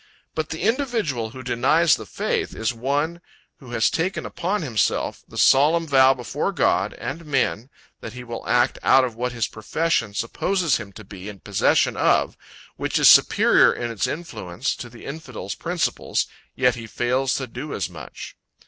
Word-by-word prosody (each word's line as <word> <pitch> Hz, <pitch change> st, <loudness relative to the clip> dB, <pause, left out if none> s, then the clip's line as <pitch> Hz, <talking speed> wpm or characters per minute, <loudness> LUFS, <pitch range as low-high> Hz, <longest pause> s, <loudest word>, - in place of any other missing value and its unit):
But 155 Hz, -1 st, -3 dB
the 160 Hz, -, -5 dB
individual 220 Hz, -, 0 dB
who 130 Hz, +3 st, -10 dB
denies 140 Hz, +7 st, +3 dB
the 110 Hz, -, -3 dB
faith, -, -, -2 dB
is 110 Hz, +2 st, -1 dB
one, 145 Hz, +8 st, -2 dB, 0.4 s
who 130 Hz, -, -14 dB
has 120 Hz, -1 st, +2 dB
taken 180 Hz, +4 st, -2 dB
upon 190 Hz, +2 st, -2 dB
himself 115 Hz, -9 st, 0 dB
the -, -, -12 dB
solemn 155 Hz, +5 st, +4 dB
vow 135 Hz, -3 st, +5 dB
before 125 Hz, -2 st, -3 dB
God -, -, +1 dB
and 165 Hz, +4 st, -6 dB
men, 135 Hz, -5 st, -1 dB, 0.3 s
that 110 Hz, -, -8 dB
he 125 Hz, 0 st, -8 dB
will 120 Hz, -1 st, -7 dB
act 125 Hz, +1 st, +2 dB
out 130 Hz, -3 st, +4 dB
what 125 Hz, +2 st, -3 dB
his 115 Hz, -2 st, -1 dB
profession 115 Hz, -1 st, -1 dB
supposes 170 Hz, -, 0 dB
him 105 Hz, -3 st, -9 dB
to 110 Hz, -, -11 dB
be 100 Hz, 0 st, -9 dB
in 100 Hz, -2 st, -10 dB
possession 100 Hz, -2 st, +2 dB
of, -, -, +2 dB, 0.4 s
which -, -, -1 dB
is -, -, +7 dB
superior -, -, +6 dB
in 120 Hz, -1 st, -4 dB
its 105 Hz, -5 st, -1 dB
influence, 135 Hz, -, -4 dB
to 120 Hz, -, -8 dB
the 115 Hz, 0 st, -13 dB
infidel's 130 Hz, -, -6 dB
principles, 175 Hz, 0 st, -1 dB, 0.3 s
yet 125 Hz, -1 st, +3 dB
he 115 Hz, -1 st, -8 dB
fails 125 Hz, +4 st, 0 dB
to 130 Hz, -, -2 dB
do 130 Hz, +5 st, -7 dB
as 95 Hz, -, -2 dB
much. -, -, -10 dB
125 Hz, 170 wpm, -23 LUFS, 115-160 Hz, 0.4 s, is